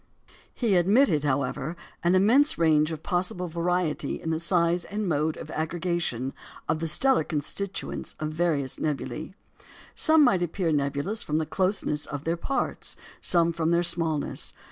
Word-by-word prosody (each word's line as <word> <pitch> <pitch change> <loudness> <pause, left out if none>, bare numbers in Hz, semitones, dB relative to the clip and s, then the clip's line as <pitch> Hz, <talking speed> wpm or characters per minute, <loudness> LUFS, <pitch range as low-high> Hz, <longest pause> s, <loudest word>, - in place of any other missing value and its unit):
He 220 -7 +1
admitted, 185 - +4
however, 140 +2 -1 0.3
an 175 +2 +3
immense 250 +11 +4
range 155 -1 +3
of 160 -1 -6
possible 180 -1 -1
variety 170 -3 -1
in 160 - -3
the 160 - 0
size 170 0 +1
and 210 0 -3
mode 155 -1 0
of 155 - -8
aggregation 160 -6 -2 0.3
of 155 +1 0
the 165 - -2
stellar 265 - +2
constituents 170 +7 -4
of 155 0 -2
various 155 -5 0
nebulæ. 150 -3 -3 0.6
Some 315 -1 +4
might 235 -9 +4
appear 175 0 -1
nebulous 145 +8 -1
from 150 - -1
the 160 - 0
closeness 185 -3 -1
of 145 -1 -5
their 165 +1 0
parts; 270 +11 -2 0.3
some 170 -1 +4
from 165 -1 0
their 170 +1 +3
smallness. 165 -3 0
170 Hz, 150 wpm, -26 LUFS, 155-180 Hz, 0.6 s, admitted